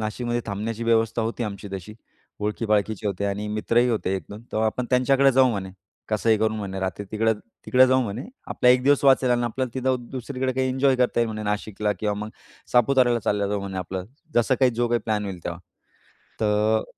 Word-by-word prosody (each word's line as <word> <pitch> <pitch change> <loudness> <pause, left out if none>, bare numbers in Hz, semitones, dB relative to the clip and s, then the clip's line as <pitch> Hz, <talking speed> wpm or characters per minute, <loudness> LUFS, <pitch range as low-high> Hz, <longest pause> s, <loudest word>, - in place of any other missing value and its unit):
नाशिकमध्ये 120 +2 -2
थांबण्याची 110 +3 -3
व्यवस्था 115 0 +2
होती 115 +2 -3
आमची 100 -1 -6
तशी, 95 +2 -7 0.5
ओळखीपाळखीचे 105 0 0
होते 100 0 -2
आणि 100 +1 -3
मित्रही 115 +3 +2
होते 105 -4 -1
1-2. 105 +3 -9
तर 110 - 0
आपण 115 +3 0
त्यांच्याकडे 135 +2 +4
जाऊ 130 0 +5
म्हणे. 95 -4 -4 0.4
कसंही 110 +1 +2
करून 110 0 +1
म्हणे 95 -2 -4
रात्री 95 +1 -3
तिकडं 110 +1 +2 0.3
तिकडं 130 0 +6
जाऊ 130 0 +3
म्हणे, 115 +2 -4 0.3
आपला 125 - +2
1 125 0 +5
दिवस 145 0 +4
वाचेल. 130 -2 +5
आणि 120 0 +2
आपल्याला 125 +2 -2
तिथं 130 -2 -1
दुसरीकडे 130 0 -3
काही 130 0 0
एन्जॉय 130 0 +2
करता 125 -1 +2
येईल 115 - +2
म्हणे 110 0 -5
नाशिकला. 105 0 -1
किंवा 105 -1 0
मग 105 +1 -5 0.4
सापुताऱ्याला 125 0 +4
चालले 100 -1 0
जाऊ 100 0 -1
म्हणे 95 -1 -5
आपलं, 95 0 -4 0.3
जसं 120 +2 +3
काही 130 -1 +5
जो 120 0 0
काही 120 0 +1
प्लॅन 105 -2 -1
होईल 95 -2 -5
तेव्हा. 85 0 -4 0.8
तर 105 +1 +2
110 Hz, 190 wpm, -24 LUFS, 105-125 Hz, 0.8 s, तिकडं